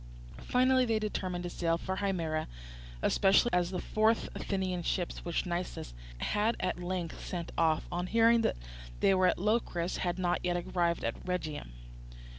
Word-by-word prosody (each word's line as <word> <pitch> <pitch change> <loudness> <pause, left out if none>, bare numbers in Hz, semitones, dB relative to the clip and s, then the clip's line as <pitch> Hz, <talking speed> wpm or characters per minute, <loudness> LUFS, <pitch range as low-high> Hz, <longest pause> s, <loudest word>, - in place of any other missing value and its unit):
Finally 255 +1 +3
they 225 -2 +1
determined 185 -4 -2
to 175 - -3
sail 165 -1 0
for 190 +2 -4
Himera, 165 -6 -1 0.6
especially 200 +5 +4
as 175 -1 +2
the 185 - -3
four 215 +1 +2
Athenian 190 -5 -1
ships 175 +1 -2
which 170 -2 -1
Nicias 175 - -4 0.2
had 210 - +1
at 185 - -1
length 175 -2 -4
sent 170 -2 -4
off, 160 -1 +2
on 175 +1 -2
hearing 230 +2 +5
that - - +1 0.4
they 195 - +4
were 185 -1 +4
at - - +2
Locris, 190 -4 0
had 175 -1 -1
not 180 -1 +1
yet 175 0 +1
arrived 170 -1 0
at 115 - -3
Rhegium. 155 - -4
180 Hz, 160 wpm, -31 LUFS, 175-200 Hz, 0.6 s, hearing